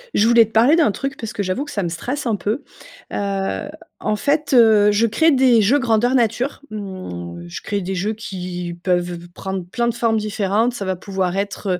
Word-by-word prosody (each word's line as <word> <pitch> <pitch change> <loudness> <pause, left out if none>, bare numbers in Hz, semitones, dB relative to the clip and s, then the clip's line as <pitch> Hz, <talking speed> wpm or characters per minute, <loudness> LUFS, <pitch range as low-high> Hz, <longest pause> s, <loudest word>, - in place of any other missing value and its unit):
Je 215 - +4
voulais 235 -1 +6
te 220 - -17
parler 235 +8 +5
d'un 320 -10 +3
truc 270 +5 -4
parce 225 -2 -5
que 205 - -3
j'avoue 195 +9 -2
que 290 - -9
ça 200 - -2
me 175 - -2
stresse 250 - -4
un 225 - +1
peu. 215 +7 -2 0.5
Heu, 200 +7 -2 0.3
en 210 - 0
fait, 285 +5 0
heu, 220 -4 +6
je 215 +3 +3
crée 320 +9 +3
des 255 -4 +5
jeux 260 +9 +4
grandeur 240 -1 +2
nature, 250 +3 0
mmh, 90 - -7
je 85 - -7
crée 205 -1 -2
des 190 +1 -3
jeux 200 +4 -1
qui 180 -4 -6
peuvent 175 -2 -1
prendre 190 -1 -5
plein 235 +7 -1
de 235 - 0
formes 230 -1 +1
différentes, 215 +2 0
ça 200 - -4
va 190 0 -1
pouvoir 190 -1 -2
être, 200 +1 -3
210 Hz, 210 wpm, -20 LUFS, 190-235 Hz, 0.5 s, voulais